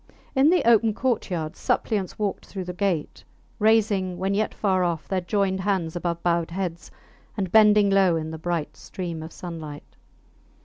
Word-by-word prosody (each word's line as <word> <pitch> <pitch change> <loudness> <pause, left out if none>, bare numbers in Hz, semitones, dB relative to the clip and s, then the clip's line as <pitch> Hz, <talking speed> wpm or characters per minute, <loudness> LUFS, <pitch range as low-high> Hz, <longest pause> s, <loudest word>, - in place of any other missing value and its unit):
In 270 +3 +5
the 355 -9 +2
open 225 -2 +4
courtyard 185 -11 -1
suppliants 200 -4 -1
walked 205 -2 -3
through 190 -2 -5
the 180 0 -6
gate, 180 -4 -2 0.4
raising, 205 -4 +2
when 190 +2 -1
yet 215 +2 0
far 190 -3 +1
off, 170 -3 -2
their 190 -1 -1
joined 190 +1 0
hands 190 -4 -1
above 170 -1 -3
bowed 170 -1 +1
heads, 175 -1 -4 0.5
and 190 -3 -2
bending 210 -1 +6
low 190 -3 +4
in 160 -1 -3
the 160 - -7
bright 170 -2 -3
stream 170 -4 -6
of 160 +1 -8
sunlight. 155 -5 -8
185 Hz, 165 wpm, -24 LUFS, 170-205 Hz, 0.5 s, bending